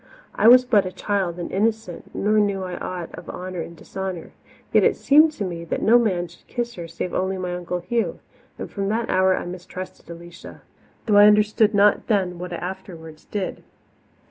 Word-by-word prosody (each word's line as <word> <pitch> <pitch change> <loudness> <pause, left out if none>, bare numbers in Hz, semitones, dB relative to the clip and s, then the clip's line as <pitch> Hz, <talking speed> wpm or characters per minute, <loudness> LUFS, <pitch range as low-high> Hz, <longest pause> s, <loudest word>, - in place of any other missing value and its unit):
I - - +3
was 250 +1 +8
but 210 -6 +3
a - - -5
child 190 -4 -2
and 175 - -5
innocent, 215 -2 -2
nor 215 +1 +2
knew 200 -2 0
I 180 -1 -5
aught 180 -2 -6
of - - -10
honour 185 -1 -5
and 170 +1 -9
dishonour. 190 -1 -6 0.4
Yet - - +5
it - - +3
seemed 305 +3 +5
to 215 - -4
me 170 -2 -5
that - - -3
no 235 +3 +6
man 185 -7 0
should 170 - -20
kiss 240 0 -3
her 170 -5 -7
save 175 +2 -5
only 190 +1 -1
my 180 -1 -3
Uncle 180 0 -4
Hugh, 230 +6 -1 0.4
and - - -5
from 195 -1 -3
that 225 +2 -1
hour 185 0 +3
I - - -4
mistrusted 180 +1 -8
Alicia, 170 +1 -11 0.4
though 210 -2 +3
I 205 0 +9
understood 210 +1 +3
not 205 0 +4
then 185 -5 0
what 180 0 -6
I - - -3
afterwards 170 -3 -8
did. 200 -3 -4
190 Hz, 195 wpm, -23 LUFS, 175-210 Hz, 0.4 s, I